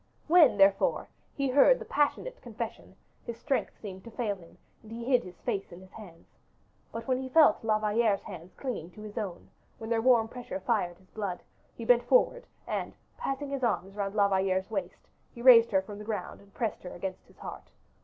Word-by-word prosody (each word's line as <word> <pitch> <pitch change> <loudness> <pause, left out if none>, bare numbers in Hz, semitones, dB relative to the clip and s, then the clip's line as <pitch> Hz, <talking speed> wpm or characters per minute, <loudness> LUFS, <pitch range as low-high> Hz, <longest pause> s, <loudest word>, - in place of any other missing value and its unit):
When, 320 -8 +6
therefore, 195 0 +3 0.3
he 275 -1 0
heard 285 - +6
the - - -8
passionate - - -1
confession, 230 -1 -7 0.3
his 235 -2 -6
strength 275 -3 -1
seemed 190 -3 -8
to - - -8
fail 220 -3 -2
him, 170 -3 -17 0.2
and 220 - -15
he 230 +1 -6
hid 250 -1 +3
his 180 -1 -12
face 195 -1 -3
in 175 - -10
his 185 0 -16
hands. 180 -7 -13 0.7
But 230 0 -7
when 255 -1 +1
he 260 - -6
felt 295 -7 +5
La 215 -1 +2
Valliere's 215 -1 +1
hands 180 -2 -10
clinging 235 - -4
to 210 - -11
his 210 -1 -9
own, 190 -5 -6 0.3
when 225 +1 -7
their 225 -1 +2
warm 235 -2 +4
pressure 250 +4 -6
fired 195 -10 -1
his 185 0 -26
blood, 200 -5 -4 0.3
he 230 - -7
bent 240 0 +5
forward, - - +2 0.2
and - - -3 0.2
passing 275 +1 -4
his 275 -1 -3
arm 195 -4 0
round 200 0 -3
La 200 -2 +4
Valliere's 190 0 0
waist, 190 -4 -5 0.3
he 235 - -8
raised 235 -3 +8
her 190 -2 +2
from 205 +1 -9
the - - -7
ground 210 -4 -5
and 200 0 -20
pressed 225 +2 -3
her 180 - -8
against 185 +1 -6
his - - -22
heart. - - -9
220 Hz, 205 wpm, -29 LUFS, 195-245 Hz, 0.7 s, raised